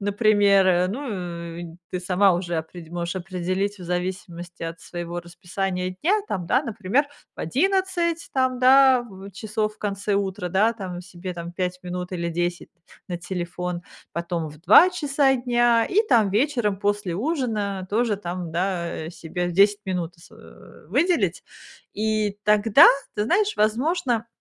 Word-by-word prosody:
например. 200 -3 +3
Ну, 180 -9 -5
и 175 - -6 0.2
ты 180 - -3
сама 185 +1 +3
уже 175 -1 -2
опре 160 +1 -6
можешь 175 +1 -3
определить 185 +2 -2
в 180 - -9
зависимости 180 -1 -5
от 165 0 -5
своего 175 0 -6
расписания 180 +1 -4
дня 410 +6 +3
там, 180 -3 -3
да, - - +2
например, 225 +5 0 0.3
в - - -9
11 345 - 0
там, 260 -1 +1
да, 260 0 +6
в 195 -4 -11
часов 215 +2 -3
в - - -32
конце 200 0 -2
утра, 195 -2 -2
да, 210 +6 +3
там 185 -5 -6
себе 180 +1 -8
там 170 0 -6
5 180 0 -3
минут 180 0 -5
или 170 -1 -2
10 175 +1 -2 0.4
на 175 - -3
телефон, 175 0 -4 0.3
потом 170 -2 -3
в 150 0 -15
2 350 - +7
часа 285 -5 +2
дня, 240 -2 +2
и 395 - +3
там 215 -5 +4
вечером 225 -3 +1
после 205 -3 -1
ужина 215 - -2
тоже 220 +1 +1
там, 180 -3 -5
да, 170 -2 -2
э, - - -6
себе 175 +1 -4
10 200 +3 +4
минут 175 -2 -3
с, 170 - -18
э, - - -16
выделить. 350 0 +1 0.5
И 215 -1 0
тогда, 210 +5 +6 0.3
ты 210 - 0
знаешь, 410 - +2
возможно, 235 +2 +1
195 Hz, 150 wpm, -24 LUFS, 175-230 Hz, 0.5 s, 2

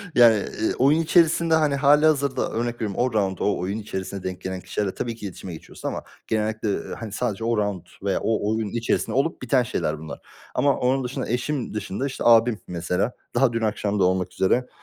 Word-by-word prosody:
Yani, 115 -2 +8
eee, 110 +2 -2
oyun 145 +5 +5
içerisinde, 165 0 +3
hani, 150 -3 +2
hâlihazırda 145 0 +3
örnek 120 +1 -1
veriyorum, 105 -4 -3
o 125 -1 +1
raunt 95 -4 0
o 105 - +1
oyun 95 +4 -2
içerisinde 95 -2 -5
denk 90 0 -5
gelen 95 -1 -4
kişilerle 95 +2 -2
tabii 115 -1 -3
ki 110 - -9
iletişime 95 -2 -7
geçiyorsun 80 - -8
ama - - -5 0.2
genellikle, 110 0 -1 0.3
hani, 115 - -7
eee 105 - -9
sadece 110 -1 -2
o 115 0 +1
raunt 100 -4 -2 0.2
veya 100 -2 +1
o 110 -1 +1
oyun 110 -1 -1
içerisinde 120 +2 -1
olup 140 +5 0
biten 130 0 +2
şeyler 80 -10 -2
bunlar. 80 -2 -8 0.4
Ama 140 -2 +3
onun 130 +1 +1
dışında, 130 +1 -4
eşim 125 +2 -2
dışında, 105 +4 -3
işte, 135 - -5
abim 115 -1 +5
mesela. 90 +6 -1 0.2
Daha 130 -3 +3
dün 115 - -1
akşam 105 -1 -1
da - - +4
olmak 90 -1 +1
üzere, 125 +7 +1
110 Hz, 200 wpm, -24 LUFS, 100-130 Hz, 0.4 s, Yani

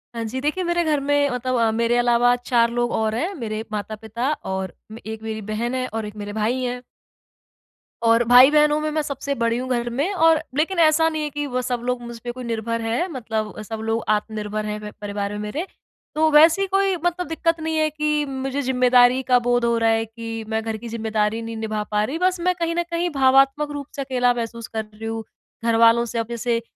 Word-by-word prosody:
हाँ 230 - -3
जी, 240 +4 -4
देखिए, 305 +6 -1
मेरे 345 0 +1
घर 305 -3 +1
में 285 0 +2
मतलब 255 +1 -2
अ, 225 -1 +3
मेरे 230 +1 +1
अलावा 240 0 +4
4 240 -1 +2
लोग 240 0 0
और 220 0 0
हैं, 345 +11 -2
मेरे 220 -4 -4
माता-पिता 220 +5 -3 0.2
और 190 -2 -4 0.2
मे 225 - -9
एक 220 - -9
मेरी 220 -1 -4
बहन 235 +4 -2
है 255 0 -1
और 220 -1 -4
एक 210 0 -8
मेरे 205 0 -6
भाई 225 +4 0
हैं। 250 0 -3 1.2
और 230 +1 +4
भाई-बहनों 295 +5 +6
में, 305 0 -1
मैं 310 0 0
सबसे 280 -1 -3
बड़ी 230 0 0
हूँ 255 +1 -4
घर 240 -1 0
में 285 +11 -1
और 325 -3 +4 0.2
लेकिन 340 +3 +1
ऐसा 320 0 +5
नहीं 310 -1 -3
है 300 - -2
कि 290 +1 -3
वो 255 -1 -2
सब 245 -1 -2
लोग 250 -1 -1
मुझपे 235 0 -7
कोई 255 +1 -8
निर्भर 230 0 -2
हैं, 235 +11 -1
मतलब 225 -6 -3
अ, - - -5
सब 220 +1 -6
लोग 225 +1 -1
आत्मनिर्भर 215 0 -1
हैं 210 0 -3
व 210 0 -8
परिवार 205 0 -3
में 210 - -5
मेरे। 245 - -3 0.5
तो 315 0 +3
वैसी 325 +6 +6
कोई 390 0 +2
मतलब 350 -1 0
दिक्कत 330 0 0
नहीं 320 0 -2
है 310 0 +2
कि 300 0 0
मुझे 270 +1 -3
ज़िम्मेदारी 250 0 +4
का 250 -1 +4
बोध 245 -1 +2
हो 235 0 +2
रहा 225 0 +2
है 225 0 +2
कि 225 0 -7
मैं 220 0 0
घर 220 -1 -3
की 235 +2 -9
ज़िम्मेदारी 220 -1 -1
नहीं 225 0 -6
निभा 215 -1 -2
पा 210 0 +2
रही, 275 +9 -2
बस 365 0 +1
मैं 365 +1 +2
कहीं 335 -1 -2
न 345 - +1
कहीं 345 +1 0
भावात्मक 275 +1 +3
रूप 285 -1 -5
से 280 - -3
अकेला 250 -2 +1
महसूस 230 -1 -5
कर 220 -1 -3
रही 215 +1 -11
हूँ, 225 0 -3 0.4
घरवालों 230 +1 +4
से। 230 0 -3
अब 225 - -2
जैसे, 235 0 -1
245 Hz, 225 wpm, -22 LUFS, 225-295 Hz, 1.2 s, भाई-बहनों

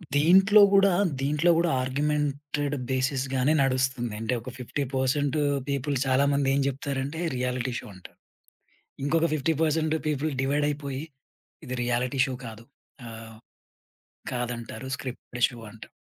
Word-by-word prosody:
దీంట్లో 190 +7 +6
గూడా, 195 0 +6 0.3
దీంట్లో 150 +5 +2
గూడా 170 0 +2
ఆర్గ్యుమెంటెడ్ 145 +1 -1 0.2
బేసిస్‌గానే 130 +1 +1
నడుస్తుంది. 130 -3 0
అంటే, 115 +3 -1
ఒక 130 - -8
50% 135 +3 -1 0.3
పీపుల్ 140 +1 -1
చాలామంది 140 +1 +2
ఏం 140 - +2
చెప్తారంటే, 140 +3 -3 0.2
రియాలిటీ 125 0 -2
షో - - -11
అంటారు. 90 - -14 0.9
ఇంకొక 165 +3 +2
50% 155 +1 +1
పీపుల్ 150 +1 -1
డివైడైపోయి 145 0 -1 0.6
ఇది 130 - -4
రియాలిటీ 125 +2 -1
షో 130 - -4
కాదు 115 0 -9 0.4
ఆహ్, 110 0 -10 1.0
కాదంటారు. 125 +1 -4
స్క్రిప్ట్‌టెడ్ 125 -1 -2
షో 120 -2 -11
అంటారు. 115 - -12
135 Hz, 110 wpm, -26 LUFS, 125-150 Hz, 1.0 s, దీంట్లో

